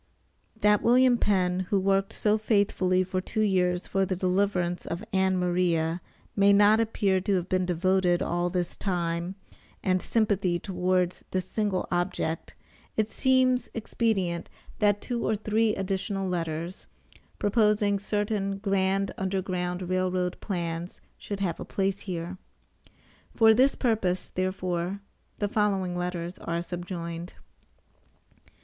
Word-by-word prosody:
That 210 0 +4
William 250 0 +5
Penn 185 -2 +1
who 200 - +3
worked 195 0 +1
so 215 0 +1
faithfully 195 -4 +2
for 185 0 -2
two 215 - -2
years 180 -3 +1
for 195 0 0
the 185 0 -1
deliverance 180 -1 0
of 170 +5 -4
Ann 190 -1 +2
Maria 175 -2 +1 0.3
may 200 0 +5
not 205 +2 +6
appear 200 -4 +1
to 195 +1 +1
have 180 -1 -1
been 185 -1 0
devoting 180 0 +2
all 175 +1 0
his 175 -1 -2
time 175 -1 -2 0.5
and 185 -1 +2
sympathy 200 -6 +1
towards 180 -1 -1
this 185 -1 -1
single 205 -4 -1
object 175 -2 -2 0.4
it 220 0 +1
seems 255 -1 +2
expedient 200 -6 -1 0.3
that 205 -1 +3
two 240 -2 -3
or 220 - +1
three 215 +1 +1
additional 195 0 -2
letters, 170 0 -3 0.5
proposing 210 -1 +2
certain 205 -1 -1
grand 195 -1 0
Underground 185 -1 -2
Rail 185 0 +1
Road 180 -1 -1
plans, 170 -2 -4 0.2
should 200 -1 -6
have 180 -4 -1
a - - -4
place 195 0 -1
here. 180 -1 -5 1.0
For 225 -1 +6
this 260 +5 +4
purpose, 200 -7 0
therefore, 185 0 -2 0.4
the 205 - 0
following 195 -4 0
letters 175 0 -4
are 170 0 -3
subjoined. 175 -1 -6
190 Hz, 130 wpm, -27 LUFS, 180-205 Hz, 1.0 s, not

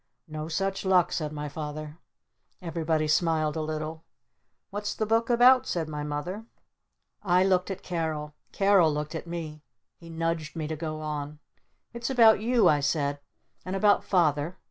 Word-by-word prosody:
"No 155 0 -6
such 195 +4 -2
luck," 185 -3 +3
said 155 -3 -2
my 150 -1 -5
Father. 150 +1 -7 0.6
Everybody 160 -3 -1
smiled 155 -1 +1
a 160 - -2
little. 155 +1 -4 0.7
"What's 205 +1 -3
the 215 - -1
Book 225 +2 +1
about?" 245 +2 +6
said 165 -3 -2
my 150 -1 -5
Mother. 175 +9 -5 0.7
I 180 -1 +3
looked 185 -1 +2
at 195 -1 -6
Carol. 160 -4 -3 0.2
Carol 195 -5 +4
looked 150 +1 -4
at 165 +1 -6
me. 160 -3 -6 0.4
He 170 - -13
nudged 165 -1 -3
me 160 -2 -3
to 160 - -3
go 155 0 -5
on. 150 -1 -5 0.6
"It's 235 +2 -4
about 230 -5 +6
You!" 240 +1 +3
I 150 - +4
said. 145 0 0 0.4
"And 185 +1 -4
about 205 +1 +3
Father! 160 -2 +1
165 Hz, 160 wpm, -27 LUFS, 155-190 Hz, 0.7 s, about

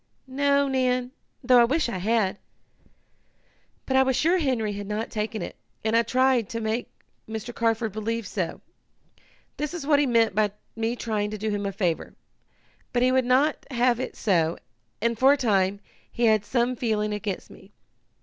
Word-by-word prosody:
"No, 280 +1 +2
Nan, 255 -2 0 0.3
though 250 -2 +6
I - - +6
wish 290 +5 +1
I 235 -6 -3
had. 205 -1 +1 1.5
But 265 - -1
I 265 - +6
was 265 -1 +2
sure 335 +8 +3
Henry 240 -9 0
had 205 0 -6
not 210 +2 -3
taken 215 0 -3
it, - - -7 0.3
and 220 +1 +2
I 230 - +6
tried 255 -1 +2
to 230 - -3
make 225 +2 -2 0.4
Mr. 220 +2 -5
Carford 225 -1 0
believe 220 +2 -3
so. 185 -3 -3 1.0
That 300 0 -2
is 325 -5 -5
what 290 -1 +4
he 290 - +2
meant 230 -4 +3
by 210 0 +1 0.2
me 225 +1 -1
trying 215 -3 -2
to 215 - -5
do 215 +1 -2
him 205 -1 -2
a - - -2
favor. 185 -5 -2 0.8
But 245 0 +1
he 255 - +4
would 260 -1 +2
not 270 +5 +2
have 245 -2 +2
it 260 - -4
so, 170 -5 +1 0.5
and, 235 -1 0
for 270 +2 +6
a - - 0
time, 200 -5 +1 0.3
he 240 - 0
had 215 -2 +3
some 245 +2 0
feeling 215 -3 -1
against 210 -2 -4
me. 195 - -16
230 Hz, 180 wpm, -25 LUFS, 210-255 Hz, 1.5 s, though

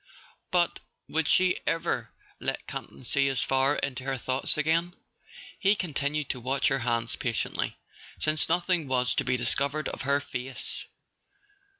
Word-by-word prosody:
But 175 -1 +2 0.3
would 160 -1 0
she 185 +1 +4
ever 165 0 0 0.3
let - - -3
Campton - - -7
see 140 +2 +3
as 135 -2 +3
far 135 +2 +3
into 130 -2 -2
her 135 0 -1
thoughts 130 +4 +1
again? 165 +4 +1 0.6
He 200 +2 +4
continued 150 -5 -1
to 130 - -2
watch 130 +3 +2
her 135 - +1
hands 115 -1 0
patiently, 115 -3 -1 0.4
since 155 0 +1
nothing 175 -2 +1
was 125 -1 +2
to - - +1
be 125 - +1
discovered 140 +5 0
of - - -6
her 140 +1 +2
face. 130 -2 -6
140 Hz, 150 wpm, -28 LUFS, 130-160 Hz, 0.6 s, she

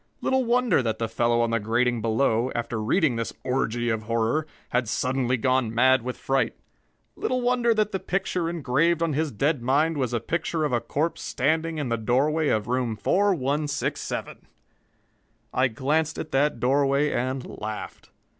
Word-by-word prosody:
Little 265 0 +1
wonder 240 - +3
that 110 -3 -1
the 115 - -1
fellow 120 +1 +1
on 115 -1 +1
the 115 - +1
grating 120 +2 +1
below, 115 +2 +1
after 120 -1 -2
reading 130 - +2
this 115 - -3
orgy 120 -2 -1
of 110 -1 0
horror, 115 +7 0 0.2
had 125 -2 0
suddenly 130 0 0
gone 130 -2 +1
mad 130 +3 +4
with 125 +2 -5
fright. 135 -3 0 0.6
Little 255 - -1
wonder 245 -1 +2
that 215 -1 +1
the 190 - -2
picture 185 -3 -1
engraved 165 +1 +1
on 165 -2 0
his 155 +1 0
dead 140 +5 0
mind 145 +6 +2
was 130 -4 -1
a 120 - 0
picture 165 +3 -2
of 150 - -1
a 120 - +2
corpse 160 +4 -2
standing 160 +4 0
in 145 -4 -2
the 115 - 0
doorway 140 +8 +1
of 110 -5 +1
room 125 -2 0
4167! 150 - -1 1.1
I 130 +1 +3
glanced 150 +7 -1
at 155 - -6
that 135 -2 +1
doorway 140 +3 +2
and 130 +1 -2 0.2
laughed. 110 0 -6
130 Hz, 165 wpm, -25 LUFS, 120-155 Hz, 1.1 s, mad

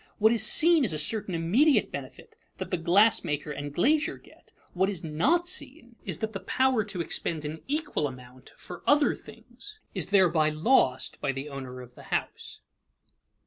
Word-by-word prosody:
What 220 +1 +4
is 230 -2 +2
seen 320 +8 +6
is 210 - -1
a - - -2
certain 190 +4 -1
immediate 230 - +2
benefit - - -9 0.2
that - - -7
the 180 - 0
glass 190 +6 +3
maker 150 -2 -3
and 145 0 -6
glazier 295 - +1
get; - - -22 0.2
what 190 +2 +1
is 185 -4 -5
not 270 - +1
seen 280 -8 -4
is 185 -6 -4
that 220 0 -4
the 195 - -4
power 255 +4 +1
to 200 -4 -4
expend 160 -2 -3
an 155 +2 -6
equal 295 - -2
amount 125 -1 -13
for 175 -1 -10
other 290 0 +4
things 425 +1 -12 0.2
is - - -2
thereby 175 -6 +3
lost 155 - +1
by 140 - 0
the 135 +2 -6
owner 130 -2 -8
of 125 -1 -14
the - - -14
house. - - -4
185 Hz, 180 wpm, -27 LUFS, -, 0.2 s, seen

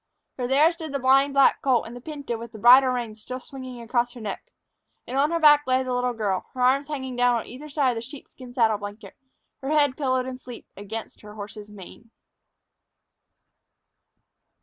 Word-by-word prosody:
For 250 -2 -3
there 290 +6 +4
stood 320 -4 -8
the - - +1
blind 270 +2 +3
black 275 -1 +4
colt 255 -4 +2
and 230 - -9
the 245 - -9
pinto 285 -3 -5
with 230 0 -9
the - - -9
bridle 255 +4 +7
reins 235 -4 -4
still 255 +4 -6
swinging 255 -2 -9
across 240 +1 0
her 245 - -11
neck. 215 - -7 0.5
And 255 - -6
on 280 +2 +3
her 335 0 0
back 295 -2 +6
lay 255 0 +2
the 255 -1 -3
little 250 0 0
girl, 205 -5 -2
her 255 - -4
arms 270 +3 +3
hanging 265 -4 -5
down 245 0 +3
on 230 - -3
either 275 +6 -10
side 280 -3 +1
of - - -5
the - - -3
sheepskin 255 0 -12
saddle 220 -4 +2
blanket, 205 0 -9 0.5
her 270 - -4
head 290 -3 +3
pillowed 260 -3 0
in 255 0 -6
sleep 245 -2 -11
against 210 +3 -8
her 210 0 -12
horse's 210 0 -9
mane. 210 +3 -13
255 Hz, 195 wpm, -25 LUFS, 230-275 Hz, 0.5 s, bridle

